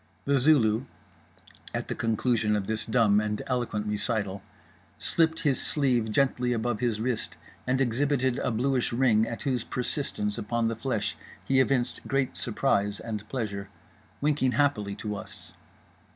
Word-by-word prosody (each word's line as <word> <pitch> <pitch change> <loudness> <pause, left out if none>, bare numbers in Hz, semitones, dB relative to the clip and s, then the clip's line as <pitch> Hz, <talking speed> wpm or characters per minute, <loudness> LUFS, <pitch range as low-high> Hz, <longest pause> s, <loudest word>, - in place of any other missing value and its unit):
The 140 -1 +3
Zulu 125 -4 +4 0.9
(at - - -2
the - - -2
conclusion 115 -1 +1
of 100 -2 -1
this 110 +2 -2
dumb 110 -3 +4
and 105 0 -2
eloquent 120 -5 -1
recital) 105 -2 -2 0.6
slipped 160 -1 +1
his 145 -5 +1
sleeve 125 -7 +1
gently 125 -1 +2
above 115 -1 -1
his 115 -3 0
wrist 120 0 -2 0.3
and 130 +1 +2
exhibited 130 0 +1
a - - 0
bluish 125 +2 +1
ring, 115 -3 +3
at 115 - -5
whose 130 -5 0
persistence 120 -5 -3
upon 115 +1 0
the 115 - -2
flesh 110 -4 -2 0.3
he 135 -1 +3
evinced 130 -2 +1
great 135 -2 0
surprise 105 -4 0
and 105 -2 -5
pleasure, 100 -6 -3 0.5
winking 140 -3 +2
happily 105 -9 +1
to 105 0 -4
us. 100 - -10
120 Hz, 145 wpm, -28 LUFS, 105-130 Hz, 0.9 s, Zulu